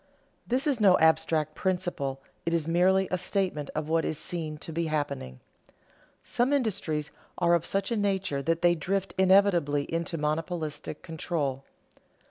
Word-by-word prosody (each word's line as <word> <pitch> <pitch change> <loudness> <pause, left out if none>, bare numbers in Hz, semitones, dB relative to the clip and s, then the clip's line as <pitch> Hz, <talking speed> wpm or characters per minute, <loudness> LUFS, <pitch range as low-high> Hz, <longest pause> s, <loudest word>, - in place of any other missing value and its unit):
_ - - -36 0.4
This 255 +3 0
is 275 -7 +1
no 190 -3 +6
abstract 160 -1 +2
principle; 165 -8 -2 0.2
it 170 0 0
is 160 -2 -1
merely 185 +3 +3
a 185 - 0
statement 180 -5 -1
of 155 0 -2
what 165 0 +2
is 155 - -2
seen 155 -3 -5
to 160 - -8
be 165 +1 -1
happening. 140 - -3 0.8
Some 250 +4 +1
industries 185 - -1 0.3
are 175 -1 +3
of 170 -1 +1
such 195 +3 -1
a - - +2
nature 195 -8 0
that 165 +4 -1
they 175 0 +6
drift 190 +4 -2
inevitably 185 -7 +4
into 165 0 -2
monopolistic 155 0 -3
control. 150 -5 -3
165 Hz, 155 wpm, -28 LUFS, 150-190 Hz, 0.8 s, no